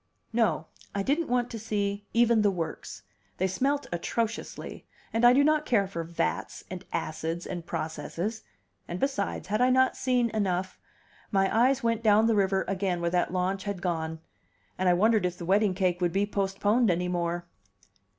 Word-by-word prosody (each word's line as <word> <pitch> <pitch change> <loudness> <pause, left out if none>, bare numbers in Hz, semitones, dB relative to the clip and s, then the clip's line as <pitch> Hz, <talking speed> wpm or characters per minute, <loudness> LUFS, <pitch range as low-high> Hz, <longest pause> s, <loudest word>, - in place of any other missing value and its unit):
No, 205 -9 +1 0.3
I 200 - 0
didn't 300 +8 +1
want 245 0 +1
to 230 - -5
see 205 -1 -2
even 235 -1 +4
the 205 - +4
works; 175 -4 -5 0.3
they 185 - +1
smelt 275 +10 0
atrociously, 225 +6 -3 0.3
and 225 +1 0
I 240 - +9
do 275 +3 +5
not 305 0 +3
care 215 -9 +2
for 170 -3 -4
vats, 170 +1 -3
and 185 0 -6
acids, 160 +2 -3
and 175 -2 -6
processes: 165 +8 -4 0.5
and 175 - -4
besides, 270 -8 -2
had 215 +3 +1
I 250 - +5
not 260 0 +4
seen 245 -3 +1
enough? 185 -3 -1 0.5
My 195 -1 +1
eyes 255 +3 +3
went 230 -1 +1
down 215 0 +5
the 225 - +3
river 195 -2 +2
again 190 -2 -1
where 170 0 -1
that 175 -1 +1
launch 185 +2 -1
had 200 -2 -3
gone; 160 -3 -2 0.5
and 185 0 +1
I 175 - +5
wondered 215 +3 +3
if 180 -1 -1
the 170 - -6
wedding 195 +1 +3
cake 180 -2 0
would 175 -1 +1
be 200 +1 +2
postponed 205 +3 +1
any 180 0 +1
more. 175 -1 -2
200 Hz, 180 wpm, -28 LUFS, 180-230 Hz, 0.5 s, I